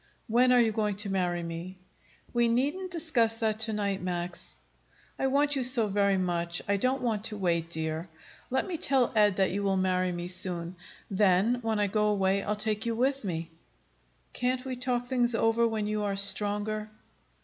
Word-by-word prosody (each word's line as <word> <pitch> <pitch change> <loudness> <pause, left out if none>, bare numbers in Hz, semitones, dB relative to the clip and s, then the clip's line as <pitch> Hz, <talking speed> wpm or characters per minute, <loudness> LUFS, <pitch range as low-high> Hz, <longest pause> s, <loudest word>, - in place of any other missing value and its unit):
"When 250 +2 +4
are 250 - +6
you 230 -2 +3
going 210 -1 -1
to 205 0 -4
marry 175 -2 -1
me?" 170 +3 -6 0.6
"We 240 -1 +3
needn't 285 +11 0
discuss 300 -10 +1
that 220 -1 -1
to 220 0 0
night, 200 -2 -1
Max." 175 -1 -5 0.6
"I 270 - +1
want 285 +2 +2
you 265 - 0
so 245 -2 +3
very 200 -1 +2
much. 170 -2 -1
I 200 0 +2
don't 255 +6 0
want 220 -3 -1
to 215 -2 -3
wait, 170 -4 0
dear. 160 +1 -3 0.4
Let 265 +1 0
me 360 -3 -4
tell 265 -5 +2
Ed 210 -2 +4
that 190 -1 +2
you 200 +2 -2
will 195 -1 +1
marry 185 -1 +1
me 175 0 -4
soon. 180 -1 -4 0.4
Then, 200 +4 +3
when 225 -2 -1
I 205 - +3
go 210 +1 +1
away, 195 -1 +1
I'll 210 +1 -2
take 215 +1 -1
you 230 - 0
with 270 +3 0
me." 165 -3 -4 0.8
"Can't 250 +1 -1
we 260 -1 -3
talk 245 -1 -1
things 245 -2 +1
over 225 +1 +2
when 220 -2 -2
you 210 0 -1
are 200 -1 -1
stronger?" 210 +2 +2
210 Hz, 190 wpm, -28 LUFS, 185-240 Hz, 0.8 s, are